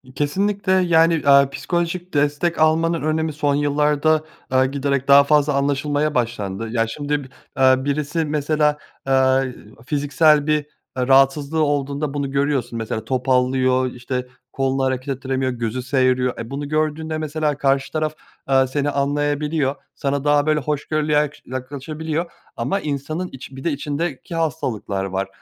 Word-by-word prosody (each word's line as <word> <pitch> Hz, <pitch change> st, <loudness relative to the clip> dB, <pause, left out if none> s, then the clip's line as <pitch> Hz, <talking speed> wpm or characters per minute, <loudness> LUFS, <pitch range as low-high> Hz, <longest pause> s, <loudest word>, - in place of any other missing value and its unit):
Kesinlikle. 195 Hz, +6 st, 0 dB
Yani, 165 Hz, -3 st, +4 dB
aaa, 140 Hz, -1 st, +6 dB
psikolojik 175 Hz, +5 st, -3 dB
destek 145 Hz, +4 st, +1 dB
almanın 165 Hz, +1 st, +2 dB
önemi 155 Hz, +1 st, -1 dB
son 145 Hz, -1 st, 0 dB
yıllarda, 150 Hz, +2 st, +2 dB, 0.3 s
eee, 130 Hz, 0 st, +4 dB
giderek 140 Hz, 0 st, -1 dB
daha 140 Hz, 0 st, +8 dB
fazla 150 Hz, 0 st, +3 dB
anlaşılmaya 145 Hz, +2 st, 0 dB
başlandı. 115 Hz, -3 st, -2 dB
Ya, 115 Hz, -1 st, +1 dB
şimdi, 145 Hz, +5 st, -4 dB, 0.4 s
eee, 130 Hz, 0 st, +6 dB
birisi 150 Hz, +4 st, -1 dB
mesela, 150 Hz, 0 st, +1 dB, 0.3 s
eee, 130 Hz, -1 st, +2 dB, 0.3 s
fiziksel 145 Hz, +1 st, +3 dB
bir, 150 Hz, 0 st, +3 dB, 0.4 s
eee, 125 Hz, 0 st, 0 dB
rahatsızlığı 140 Hz, +3 st, +3 dB
olduğunda 145 Hz, 0 st, -1 dB
bunu 140 Hz, -2 st, -2 dB
görüyorsun, 140 Hz, -4 st, 0 dB
mesela, 110 Hz, -1 st, -4 dB
topallıyor, 130 Hz, 0 st, +1 dB
işte, 125 Hz, +1 st, -4 dB, 0.3 s
kolunu 135 Hz, 0 st, 0 dB
hareket 130 Hz, +1 st, -1 dB
ettiremiyor 130 Hz, -1 st, -1 dB
gözü 120 Hz, 0 st, -3 dB
seğiriyor. 130 Hz, -1 st, +1 dB
E, 115 Hz, 0 st, -6 dB
bunu 140 Hz, +1 st, -4 dB
gördüğünde, 155 Hz, +1 st, -1 dB
mesela 155 Hz, -1 st, -1 dB
karşı 135 Hz, 0 st, +1 dB
taraf, 155 Hz, -1 st, -1 dB, 0.4 s
eee, 135 Hz, -1 st, +4 dB
seni 145 Hz, +2 st, -1 dB
anlayabiliyor 145 Hz, 0 st, 0 dB, 0.2 s
sana 140 Hz, 0 st, -2 dB
daha, 145 Hz, 0 st, +3 dB
böyle, 155 Hz, -1 st, +2 dB
hoşgörülü 150 Hz, +1 st, -2 dB
yak 150 Hz, 0 st, +2 dB
yaklaşabiliyor 150 Hz, +6 st, -4 dB, 0.2 s
ama 195 Hz, +1 st, -1 dB
insanın 155 Hz, +4 st, -3 dB
içi 135 Hz, 0 st, -10 dB
bir 135 Hz, -, -9 dB
de 170 Hz, -, 0 dB
içindeki 145 Hz, +2 st, -4 dB
hastalıklar 115 Hz, -11 st, -2 dB
var. 95 Hz, 0 st, -2 dB
145 Hz, 140 wpm, -21 LUFS, 130-155 Hz, 0.4 s, daha